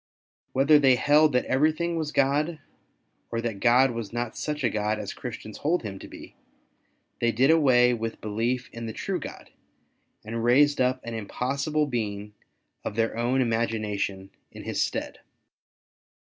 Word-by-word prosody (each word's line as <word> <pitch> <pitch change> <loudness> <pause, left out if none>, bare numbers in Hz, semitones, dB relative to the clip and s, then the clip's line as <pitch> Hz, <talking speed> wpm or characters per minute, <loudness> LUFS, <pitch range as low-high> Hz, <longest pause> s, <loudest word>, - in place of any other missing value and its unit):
Whether 145 +3 +5
they 135 -3 +5
held 150 +4 +4
that 125 - +2
everything 155 +5 +1
was 155 -2 -2
God, 145 +4 +1 0.7
or 115 - -2
that 115 -4 -3
God 125 +4 +4
was 115 -3 -5
not 120 -1 -3
such 150 -1 -3
a 120 - +3
God 105 0 -1
as - - -5
Christians - - -8
hold 165 +2 0
Him 100 -3 -6
to - - -10
be, - - -12 0.9
they 120 0 +2
did 130 +6 +3
away 125 -6 +5
with 115 -1 -4
belief 115 +4 -2
in 115 0 -6
the 110 - -5
true - - -3
God, - - -9 0.7
and 115 +1 -4
raised 140 +4 +4
up 130 0 +1
an 115 - -6
impossible 140 +7 -1
being 105 -5 -4 0.5
of - - -4
their 115 0 0
own 120 +3 +1
imagination 105 -4 -2 0.2
in - - -10
His - - -2
stead. - - -3
120 Hz, 160 wpm, -26 LUFS, 115-140 Hz, 0.9 s, Whether